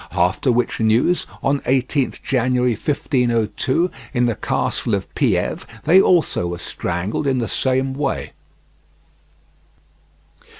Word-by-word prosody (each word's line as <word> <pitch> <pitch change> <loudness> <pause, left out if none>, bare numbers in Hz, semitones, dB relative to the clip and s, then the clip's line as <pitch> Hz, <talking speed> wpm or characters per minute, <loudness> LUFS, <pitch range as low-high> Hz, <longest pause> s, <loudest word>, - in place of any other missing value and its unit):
After 90 +9 +2
which 120 +1 0
news, 115 +10 +2 0.2
on 140 +1 +2
18th 130 +1 -1
January 125 -1 +1
1502, 130 - 0 0.2
in 125 0 +3
the 120 - +1
castle - - -1
of - - -6
Pieve, - - 0 0.2
they 185 +3 +6
also 170 - +2
were 85 0 -4
strangled 90 - -3
in 135 -1 +1
the 120 -2 -1
same 130 0 0
way. 140 0 -3
125 Hz, 115 wpm, -20 LUFS, 115-140 Hz, 0.2 s, they